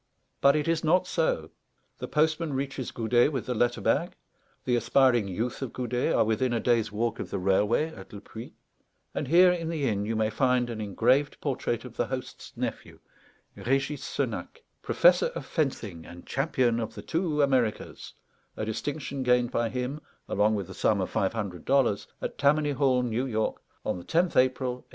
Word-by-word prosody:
But 140 +1 +6
it 150 +1 0
is 165 -1 +1
not 180 +4 +3
so; 160 - -1 0.5
the - - -4
postman 155 0 +1
reaches 135 -1 -3
Goudet 120 +4 +2
with 130 -5 -3
the 125 - -1
letter 120 +1 +1
bag; - - +1 0.5
the 125 - +2
aspiring 120 -2 +3
youth 110 +9 -3
of 130 -4 -4
Goudet 125 0 -1
are - - +4
within 115 +3 +1
a 115 - +1
day's 115 -2 +1
walk 115 +2 -1
of - - -5
the - - -3
railway 105 - +1
at - - -12
Le 100 - -8
Puy; 110 +3 -10 0.6
and 145 - -3
here 180 +5 +6
in 165 -2 -2
the 155 -4 -1
inn 100 -2 0
you 110 +2 -2
may 110 0 +1
find 125 0 +1
an 110 -2 -5
engraved 125 +8 +1
portrait 125 -4 -2
of 125 - -11
the - - 0
host's 130 -1 -7
nephew, - - -4 0.6
Régis 135 +3 -1
Senac, 470 0 -4 0.2
"Professor - - +4
of - - -5
Fencing 110 - -2
and 85 +1 -12
Champion 130 -4 +1
of 115 0 -4
the - - -8
two 160 -3 0
Americas," 130 -6 -1 0.4
a 110 - -2
distinction 135 +5 -4
gained 125 -1 +2
by 115 -2 0
him, 125 +5 -3 0.3
along 105 +2 +2
with 100 -2 -3
the 95 - -10
sum 105 +2 +1
of 95 - -2
five 95 +1 0
hundred 100 -6 -4
dollars, 130 -7 +2 0.2
at - - -4
Tammany 145 +1 +3
Hall, 130 -2 +2
New 125 +2 -1
York, 110 -3 -1 0.2
on - - -1
the - - -10
10th 170 +1 +1
April 130 0 +2
1876. 125 - -14
125 Hz, 190 wpm, -27 LUFS, 110-140 Hz, 0.6 s, But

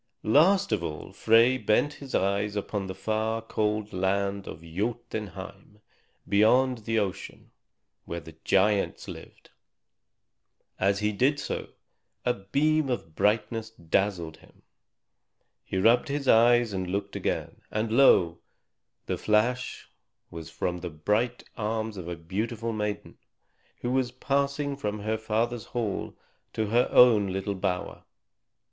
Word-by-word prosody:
Last 185 - +4
of - - 0
all 75 -2 -6
Frey 115 +3 +4
bent 130 +7 +2
his 140 -2 -7
eyes 100 +2 0
upon 100 -1 -3
the 95 - -6
far, 110 +3 -1
cold 105 -1 -2
land 100 +1 -1
of 80 - -8
Jotunheim, 100 +1 -5 0.5
beyond 125 +5 +4
the 115 0 0
ocean, 100 -2 -4 0.5
where 85 - -4
the 80 0 -13
giants 100 +1 +2
lived; - - -11 1.3
and 95 - +3
as 100 0 +1
he 105 0 +1
did 135 +8 +2
so, - - -4 0.6
a 125 - +3
beam 140 +9 +1
of 80 -10 -3
brightness 110 +3 0
dazzled 85 -4 -1
him. - - -22 1.0
He - - -4
rubbed 115 +6 +4
his 140 -1 -3
eyes 120 -1 +5
and 95 -1 -2
looked 100 +1 -3
again; - - -3
and 110 +1 -2
lo! 90 -9 +5 0.7
the - - -3
flash 120 +4 0 0.4
was 80 -1 -8
from 90 -1 -3
the 90 0 -5
bright 105 +10 -1
arms 110 0 -2
of 90 -3 -7
a 85 - -4
beautiful 110 +7 -3
maiden, 105 -1 -4 0.6
who 120 - -2
was 130 -1 +1
passing 140 +2 -1
from 105 -6 -4
her 110 +1 -1
father's 110 +1 -1
hall 110 -5 -3 0.4
to 110 - -1
her 120 +2 +3
own 115 -5 +6
little 95 +2 -2
bower. 95 -2 -3
105 Hz, 135 wpm, -27 LUFS, 95-120 Hz, 1.3 s, own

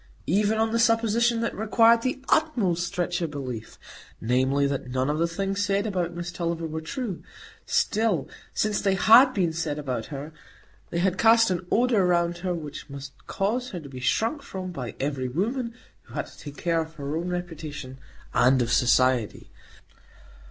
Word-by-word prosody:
Even 210 +5 +2
on 220 0 +1
the 230 - +1
supposition 230 0 +3
that 230 - -1
required 230 +2 +4
the 260 +2 -2
utmost 200 - +1
stretch 175 -1 -2
of 165 - -1
belief,—namely, 130 0 -2
that 140 -2 -2
none 130 +2 0
of 155 - -2
the 170 - +2
things 195 +4 -2
said 200 0 +1
about 180 -5 -2
Miss 175 +1 -5
Tulliver 170 -2 -3
were 160 0 -4
true,—still, 210 - -2 0.2
since 210 -1 0
they 195 -2 +2
had 240 +7 +7
been 175 -5 +1
said 160 -2 -2
about 130 -6 -3
her, 145 +2 -7 0.6
they - - -3
had 185 +1 +1
cast 225 -2 +5
an 180 0 -3
odor 235 -4 +3
round 175 -1 +1
her 180 0 -2
which 150 -4 -7
must 140 0 -8
cause 235 +6 -1
her 180 - -5
to 145 -3 -11
be 130 -1 -8
shrunk 225 - 0
from 185 -8 -6
by 125 -9 -6
every 135 -2 -2
woman 230 - -2 0.3
who - - -14
had - - -2
to - - -16
take 145 -1 -9
care 165 -1 +1
of 160 0 -8
her 145 0 -4
own 170 +2 -2
reputation—and 150 -6 -2
of 120 - -3
Society. 125 -2 +2
175 Hz, 170 wpm, -26 LUFS, 145-215 Hz, 0.6 s, had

